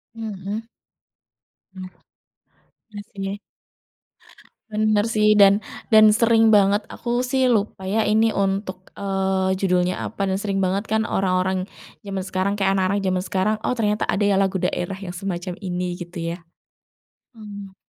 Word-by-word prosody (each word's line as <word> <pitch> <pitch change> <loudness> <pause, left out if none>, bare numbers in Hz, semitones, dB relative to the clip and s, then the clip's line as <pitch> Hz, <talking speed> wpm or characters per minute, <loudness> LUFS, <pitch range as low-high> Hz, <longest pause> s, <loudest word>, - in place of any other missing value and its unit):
Mhm. 215 0 -5 1.1
Hmm, 185 -1 -8 1.0
iya 205 -1 -8 0.3
sih. 205 - -7 1.3
Bener 215 0 +2
sih, 215 -1 +3
dan 200 +1 +6 0.3
dan 215 0 +8
sering 225 0 +4
banget 205 0 +4
aku 240 +1 -2
sih 260 +1 +1
lupa 210 -5 0
ya 215 +4 +1
ini 220 +1 +2
untuk, 195 -1 -2
eee, 190 -1 0
judulnya 180 -1 +1
apa 200 - -3
dan 190 0 0
sering 200 -2 -2
banget 195 +2 -1
kan 220 0 +1
orang-orang 185 -1 0 0.3
zaman 195 -2 -4
sekarang 190 +1 -1
kayak 195 -1 +2
anak-anak 195 +1 +1
zaman 185 -1 +1
sekarang, 195 +3 0
oh 250 - -1
ternyata 210 -1 0
ada 200 +2 +1
ya 200 -1 +3
lagu 190 0 0
daerah 185 +1 -2
yang 185 -3 -7
semacam 180 -1 -4
ini 180 -1 -3
gitu 175 +1 -8 0.2
ya. - - -7 1.0
Hmm. 200 -2 -10
195 Hz, 140 wpm, -22 LUFS, 190-215 Hz, 1.3 s, dan